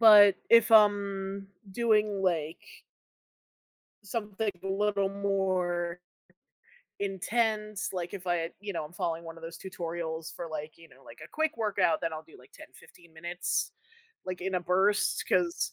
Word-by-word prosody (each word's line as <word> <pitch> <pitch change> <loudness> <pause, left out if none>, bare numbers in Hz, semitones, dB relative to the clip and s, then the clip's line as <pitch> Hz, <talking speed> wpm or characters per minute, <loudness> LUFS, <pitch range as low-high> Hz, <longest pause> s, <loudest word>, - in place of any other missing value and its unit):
But, 205 -3 +9
if 230 -1 +7
I'm 200 -2 +3 0.2
doing 210 -2 +2
like 165 -3 -1 1.4
something 210 0 -2
a - - -6
little 200 0 +1
more 185 -3 0 1.0
intense, 210 +1 -1
like, 175 -1 -3
if 185 -2 -7
I, 170 -1 0
you 205 -2 -5
know, 155 - -2
I'm 150 - -11
following 165 -1 -2
one 165 0 -9
of - - -16
those 165 0 -7
tutorials 165 -3 -5
for 170 - -5
like, 155 0 -5
you 165 - -15
know, 135 +1 -20
like - - -13
a - - -12
quick 315 -4 0
workout, 200 -7 +1
then 165 -1 -1
I'll 155 - -5
do 160 0 -17
like 125 - -19
10, - - -12
15 170 -2 -18
minutes, 175 +2 -2 0.5
like 185 -1 -4
in 190 0 -2
a 180 - +1
burst, 190 +4 +2
'cause 175 -2 +1
190 Hz, 155 wpm, -29 LUFS, 170-205 Hz, 1.4 s, But